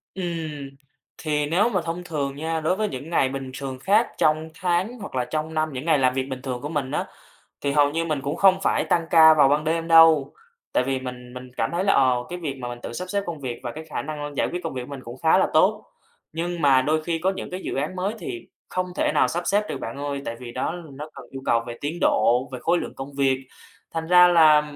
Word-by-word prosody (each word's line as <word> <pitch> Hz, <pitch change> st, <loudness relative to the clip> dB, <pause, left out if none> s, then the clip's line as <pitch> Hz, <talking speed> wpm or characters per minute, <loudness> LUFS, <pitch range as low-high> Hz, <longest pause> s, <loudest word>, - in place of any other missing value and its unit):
Ừm, 160 Hz, -6 st, -4 dB, 0.5 s
thì 150 Hz, -2 st, -1 dB
nếu 180 Hz, +10 st, +2 dB
mà 185 Hz, -6 st, 0 dB
thông 170 Hz, +2 st, -4 dB
thường 145 Hz, -5 st, -3 dB
nha, 160 Hz, +2 st, -2 dB
đối 160 Hz, +4 st, +1 dB
với 215 Hz, +1 st, -1 dB
những 140 Hz, +2 st, -7 dB
ngày 135 Hz, -6 st, +2 dB
bình 135 Hz, -1 st, -5 dB
thường 135 Hz, -2 st, -5 dB
khác 210 Hz, -, +3 dB
trong 155 Hz, +1 st, +2 dB
tháng 185 Hz, +6 st, -1 dB
hoặc 200 Hz, -, -8 dB
là 125 Hz, -1 st, 0 dB
trong 155 Hz, +4 st, -3 dB
năm 155 Hz, 0 st, 0 dB
những 130 Hz, +4 st, -5 dB
ngày 160 Hz, -3 st, +4 dB
làm 130 Hz, -1 st, +3 dB
việc 130 Hz, 0 st, 0 dB
bình 130 Hz, -1 st, -5 dB
thường 125 Hz, -2 st, -4 dB
của 145 Hz, -, -5 dB
mình 145 Hz, -4 st, -2 dB
á, -, -, -1 dB, 0.6 s
thì 140 Hz, -, 0 dB
hầu 145 Hz, 0 st, +4 dB
như 165 Hz, +1 st, -1 dB
mình 155 Hz, -4 st, -2 dB
cũng 140 Hz, +3 st, -3 dB
không 190 Hz, -1 st, +5 dB
phải -, -, +2 dB
tăng 170 Hz, -1 st, +2 dB
ca 160 Hz, -1 st, +8 dB
vào 145 Hz, -3 st, +5 dB
ban 150 Hz, +1 st, +2 dB
đêm 165 Hz, +1 st, -1 dB
đâu. 165 Hz, -4 st, +6 dB, 0.4 s
Tại -, -, +3 dB
vì 135 Hz, 0 st, -1 dB
mình 125 Hz, -1 st, -8 dB
mình 125 Hz, 0 st, -9 dB
cảm 115 Hz, -, 0 dB
thấy 175 Hz, +2 st, -1 dB
là, 200 Hz, -, +4 dB
ờ, 130 Hz, -2 st, +4 dB
cái 180 Hz, -, -5 dB
việc 145 Hz, -5 st, -4 dB
mà 125 Hz, -, -5 dB
mình 120 Hz, 0 st, -6 dB
tự -, -, -6 dB
sắp 180 Hz, +8 st, -5 dB
xếp 200 Hz, +1 st, -1 dB
công 170 Hz, -3 st, -5 dB
việc 125 Hz, -4 st, -5 dB
và 120 Hz, -, -4 dB
cái 155 Hz, +5 st, -9 dB
khả 155 Hz, -, -4 dB
năng 145 Hz, -1 st, -6 dB
giải -, -, +2 dB
quyết 175 Hz, 0 st, -4 dB
công 165 Hz, -, -4 dB
việc 125 Hz, -, -4 dB
của -, -, -9 dB
mình 140 Hz, -2 st, -6 dB
cũng 120 Hz, +2 st, -9 dB
khá 160 Hz, +3 st, +5 dB
là -, -, +3 dB
tốt. -, -, +3 dB, 0.5 s
Nhưng 170 Hz, +1 st, -3 dB
mà 135 Hz, -2 st, +5 dB
đôi 155 Hz, +3 st, 0 dB
khi 165 Hz, 0 st, -1 dB
có 185 Hz, +4 st, +1 dB
những -, -, -6 dB
cái 185 Hz, +1 st, -5 dB
dự -, -, -4 dB
án 150 Hz, +7 st, -2 dB
mới 190 Hz, +3 st, -1 dB
thì 355 Hz, -1 st, -7 dB, 0.2 s
không 185 Hz, 0 st, -2 dB
thể -, -, +1 dB
nào -, -, +4 dB
sắp 175 Hz, +1 st, -3 dB
xếp 205 Hz, +2 st, +2 dB
được, -, -, -4 dB
bạn 115 Hz, +4 st, -6 dB
ơi, 140 Hz, -1 st, -3 dB
tại 115 Hz, -, -4 dB
vì 125 Hz, -2 st, -8 dB
đó, 130 Hz, +5 st, -2 dB, 0.2 s
nó 150 Hz, +3 st, -8 dB
cần 135 Hz, -, -11 dB
yêu 135 Hz, 0 st, -7 dB
cầu 115 Hz, -, +3 dB
về 120 Hz, -, -6 dB
tiến 155 Hz, +4 st, -3 dB
độ, 125 Hz, +4 st, +3 dB
về 130 Hz, -, -6 dB
khối 170 Hz, +2 st, +2 dB
lượng -, -, -5 dB
công 135 Hz, +1 st, -8 dB
việc. 135 Hz, -1 st, +2 dB, 0.6 s
Thành 160 Hz, 0 st, -3 dB
ra 180 Hz, 0 st, +8 dB
là, 155 Hz, -3 st, +6 dB
155 Hz, 265 wpm, -24 LUFS, 135-170 Hz, 0.6 s, ca